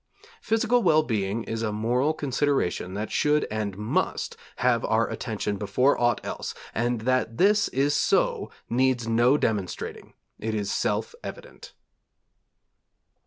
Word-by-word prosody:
Physical 225 +2 +2
well 155 -6 +4
being 110 -3 -1
is 115 0 -4
a 110 -2 -1
moral 120 +7 +1
consideration 135 - -1
that 105 +2 -4
should 150 0 +2
and 105 -3 -3
must 105 +1 -1 0.2
have 120 -2 +2
our 115 +1 +2
attention 105 -3 -3
before 105 +8 +2
aught 120 -2 +3
else, - - -5 0.2
and 120 0 0
that 125 -1 0
this 200 +1 +4
is 140 +2 +1
so - - +1 0.2
needs 125 -1 +1
no 120 +5 +4
demonstrating; 105 -9 -3 0.3
it 110 0 -2
is 100 -2 -2
self - - -1
evident. - - -9
120 Hz, 130 wpm, -26 LUFS, 110-145 Hz, 0.3 s, well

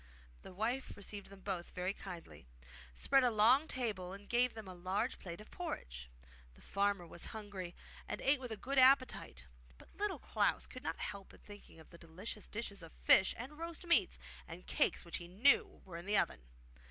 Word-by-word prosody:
The - - -10
wife 230 +8 -2
received 200 0 -5
them 195 -1 -13
both 185 -3 -4
very 180 +2 -1
kindly, 175 - -9 0.5
spread 270 - +4
a 250 - +5
long 240 +7 +5
table, 205 - -2
and 200 +1 -10
gave 245 0 +2
them 220 -3 -7
a 185 - -7
large 190 +7 -1
plate 170 -1 -7
of 210 - -13
porridge. 60 - -5 0.5
The - - -19
farmer 200 -2 +1
was 170 0 -6
hungry, 195 -5 -6 0.3
and - - -3
ate 275 +1 +3
with 250 -2 -6
a 220 - -4
good 270 +4 +1
appetite; 255 - +4 0.3
but - - -18
Little 410 -1 0
Klaus - - +1
could 255 - -9
not - - -3
help 200 -1 -6
thinking 205 -5 -13
of 160 - -16
the 170 - -13
delicious 185 +6 -7
dishes 205 -3 -5
of 165 -1 -11
fish 190 - +6
and 270 +6 -8
roast 335 +1 -6
meats 340 0 +3 0.3
and - - -9
cakes - - +1
which - - -3
he 175 - -8
knew 280 - +4
were 170 -3 -7
in 175 +3 -9
the 205 0 +4
oven. 65 - +1
205 Hz, 190 wpm, -36 LUFS, 180-255 Hz, 0.5 s, fish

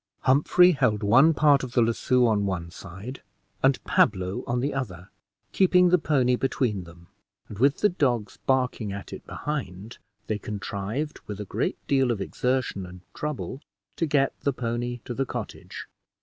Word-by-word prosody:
Humphrey 150 +7 +5
held 125 - +1
one 130 +10 +6
part 145 -2 +4
of 125 -2 -6
the 125 - +4
lasso 125 +2 +2
on 105 -3 +2
one 85 -3 -3
side, 95 +8 -9 0.4
and 135 0 +4
Pablo 95 -2 +1
on 120 0 0
the 140 +4 -1
other, 95 -10 -5 0.4
keeping 180 -1 +4
the 180 0 +4
pony 130 -5 +2
between 120 -7 -1
them; 85 0 -15 0.4
and 105 - -9
with 140 +3 +3
the 210 - +5
dogs 125 -10 -1
barking 125 -5 +1
at 100 0 -7
it - - -8
behind, 115 -8 -5 0.3
they 110 -1 -2
contrived, 105 +8 -4
with 105 -1 -6
a 105 - -4
great - - -2
deal 135 -2 +3
of 115 -4 0
exertion 125 0 -1
and 90 0 -12
trouble, 150 -2 -4 0.4
to 165 - 0
get 140 -2 +2
the 140 - 0
pony 120 0 -3
to 120 - -4
the 135 - 0
cottage. - - -7
125 Hz, 165 wpm, -26 LUFS, 100-135 Hz, 0.4 s, one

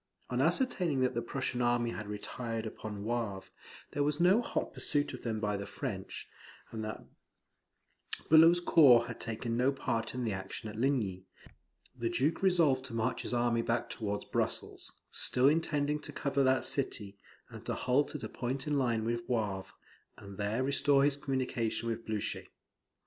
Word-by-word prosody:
On 125 +1 +1
ascertaining 170 - +2
that 130 - +2
the 120 - -1
Prussian 130 -1 -2
army 120 -1 +2
had 105 -2 -6
retired 115 +2 -4
upon 105 -2 -6
Wavre, 110 -4 -2
that - - -22 0.4
there 145 - -1
was 150 +1 0
no 185 +6 +5
hot - - -3
pursuit 145 -1 -1
of - - -7
them 110 -2 -2
by 105 -1 0
the 100 0 -5
French, - - -5 0.4
and 110 -1 -4
that 110 -1 -6 1.2
Bulow's 165 +2 +7
corps 135 -9 +6
had 115 -1 -7
taken 115 0 -3
no 125 +3 +3
part 115 -4 -2
in 125 - -2
the 110 -3 -1
action 95 +3 -6
at - - -11
Ligny, 110 -7 0 0.7
the 120 -2 -2
Duke 135 +10 0
resolved 165 -9 +3
to 125 -3 -7
march 115 +2 0
his - - -4
army 120 -1 +2
back 115 0 -1
towards 105 -2 -3
Brussels, - - -2 0.2
still 125 +1 +3
intending 150 -1 +1
to - - -6
cover 140 -1 0
that 130 0 +3
city, 105 -7 -2 0.3
and - - -9
to - - -1
halt 140 +4 +1
at 150 - -5
a - - -2
point 130 +3 -3
in 150 - -1
a - - +2
line 120 -4 +1
with 120 +1 -1
Wavre, 105 -6 -1 0.5
and 100 -1 -11
there 105 +5 0
restore 140 0 +4
his 145 -1 +3
communication 130 -5 -2
with 115 0 -3
Blucher. 110 -2 -2
120 Hz, 175 wpm, -32 LUFS, 110-140 Hz, 1.2 s, Bulow's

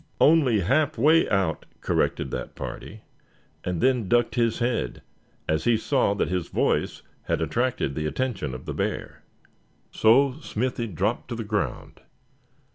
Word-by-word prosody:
"Only 140 -9 +5
half 145 - +1
way 155 +7 +4
out," 95 -6 0
corrected - - 0
that - - -5
party; 105 +2 -7 0.6
and 90 -2 -2
then 125 -7 +2
ducked 120 -1 +3
his 115 -2 +1
head 120 - -2 0.4
as 80 0 0
he 120 -1 +4
saw 120 -3 +1
that 100 - 0
his 90 -2 -2
voice - - 0 0.2
had - - 0
attracted 120 - -1
the 75 +2 -2
attention 95 - -2
of 65 - -9
the - - -4
bear. - - -3 0.7
So 130 +5 +4
Smithy 125 -3 -2
dropped 100 +4 -2
to 120 - -4
the 115 - -4
ground. 105 -1 -3
115 Hz, 145 wpm, -25 LUFS, 95-130 Hz, 0.7 s, Only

